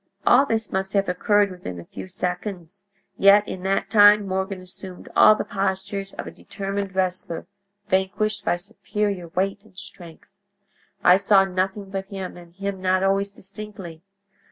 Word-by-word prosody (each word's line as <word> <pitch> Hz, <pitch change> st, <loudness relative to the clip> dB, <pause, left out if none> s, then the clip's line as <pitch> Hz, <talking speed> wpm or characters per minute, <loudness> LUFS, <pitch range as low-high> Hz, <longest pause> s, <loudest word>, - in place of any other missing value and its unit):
"All 270 Hz, +3 st, +6 dB
this 225 Hz, -2 st, -1 dB
must 190 Hz, 0 st, -2 dB
have 200 Hz, -1 st, +2 dB
occurred 200 Hz, +2 st, +2 dB
within 90 Hz, -, -7 dB
a 85 Hz, -, -10 dB
few -, -, -9 dB
seconds, 185 Hz, 0 st, -5 dB, 0.3 s
yet 200 Hz, +1 st, +6 dB
in 185 Hz, -, -6 dB
that 195 Hz, +1 st, -1 dB
time 205 Hz, -1 st, +7 dB
Morgan 190 Hz, 0 st, -2 dB
assumed 185 Hz, 0 st, -10 dB
all 215 Hz, -, +8 dB
the -, -, -3 dB
postures 195 Hz, 0 st, -3 dB
of -, -, -6 dB
a -, -, -7 dB
determined 195 Hz, -1 st, -5 dB
wrestler 185 Hz, -3 st, -1 dB, 0.4 s
vanquished 200 Hz, +2 st, 0 dB
by -, -, +1 dB
superior 200 Hz, -1 st, -3 dB
weight 190 Hz, +4 st, -2 dB
and 185 Hz, -, -23 dB
strength. 170 Hz, -3 st, -10 dB, 0.8 s
I 180 Hz, -, +7 dB
saw 195 Hz, 0 st, +4 dB
nothing 190 Hz, +1 st, -2 dB
but 195 Hz, -1 st, -3 dB
him, 195 Hz, -2 st, -6 dB
and 175 Hz, -1 st, -14 dB
him 200 Hz, -1 st, -4 dB
not 185 Hz, 0 st, +2 dB
always 195 Hz, +1 st, +1 dB
distinctly. 195 Hz, -4 st, -9 dB
195 Hz, 155 wpm, -23 LUFS, 185-200 Hz, 0.8 s, all